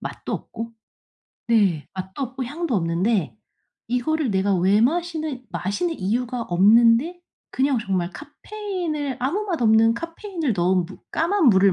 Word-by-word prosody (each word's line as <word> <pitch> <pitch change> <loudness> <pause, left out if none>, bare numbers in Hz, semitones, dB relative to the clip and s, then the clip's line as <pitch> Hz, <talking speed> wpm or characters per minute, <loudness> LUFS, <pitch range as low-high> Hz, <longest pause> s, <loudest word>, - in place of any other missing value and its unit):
맛도 - - -6
없고 230 0 -6 0.8
네 200 -10 +2
맛도 190 +7 -6
없고 260 0 -4
향도 300 +2 -3
없는데 170 - 0 0.5
이거를 275 +3 0
내가 195 0 +1
왜 190 +4 +3
마시는 315 -2 -1
마시는 325 - -2
이유가 240 +5 -1
없는데 230 - +4 0.3
그냥 265 -2 +1
정말 185 -4 -1
카페인을 310 -2 -5
아무 295 +12 0
맛없는 230 - +3
카페인을 335 - -3
넣은 180 0 +2
무 190 - -12
까만 345 +1 +2
물을 195 -2 +5
240 Hz, 285 characters per minute, -23 LUFS, 195-315 Hz, 0.8 s, 물을